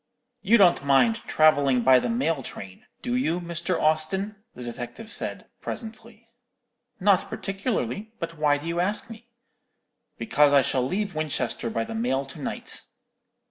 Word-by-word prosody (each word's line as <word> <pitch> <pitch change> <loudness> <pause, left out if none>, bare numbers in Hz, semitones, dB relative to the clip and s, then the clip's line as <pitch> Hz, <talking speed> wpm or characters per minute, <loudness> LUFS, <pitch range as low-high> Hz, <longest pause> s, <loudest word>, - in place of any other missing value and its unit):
"'You 230 +4 +5
don't 180 -8 +5
mind 140 - +4
travelling 140 -5 +4
by 130 0 +7
the - - -2
mail 230 - 0
train, 95 -6 -9 0.2
do 245 -1 -1
you, 180 -9 0
Mr. 170 +1 -2
Austin?' 160 +7 0 0.2
the 125 - -8
detective 120 - -6
said, - - -3 0.2
presently. 225 0 -8 0.7
"'Not 195 -1 +3
particularly; 200 - -3
but 165 -3 -5
why 150 -2 +2
do 145 - -10
you 170 +1 -2
ask 205 +5 0
me?' 230 +2 -12 0.9
"'Because 150 -9 +3
I 140 -1 +6
shall 130 - 0
leave 195 +10 -2
Winchester 145 -6 -2
by 115 0 -1
the - - -7
mail 225 - 0
to 135 - -10
night.' - - -4
170 Hz, 150 wpm, -25 LUFS, 140-215 Hz, 0.9 s, by